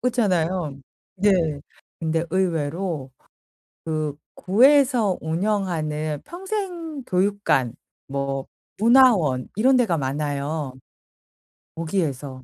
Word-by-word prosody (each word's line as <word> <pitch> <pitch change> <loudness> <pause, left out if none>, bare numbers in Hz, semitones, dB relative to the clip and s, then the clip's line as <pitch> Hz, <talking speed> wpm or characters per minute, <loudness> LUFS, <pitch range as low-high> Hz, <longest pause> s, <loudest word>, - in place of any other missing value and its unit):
그렇잖아요. 185 - 0 0.4
네. 205 +2 +3 0.7
근데 165 0 0
의외로 165 -4 -1 0.7
그 155 -2 -2 0.2
구에서 245 -1 +4
운영하는 160 -4 -1
평생 350 -6 -5
교육관 185 - +1 0.3
뭐 140 -1 -3 0.3
문화원 220 - +4
이런 260 +4 +4
데가 215 -10 +2
많아요. 145 +1 -2 1.0
거기에서 145 -6 -3
170 Hz, 190 characters per minute, -23 LUFS, 145-215 Hz, 1.0 s, 구에서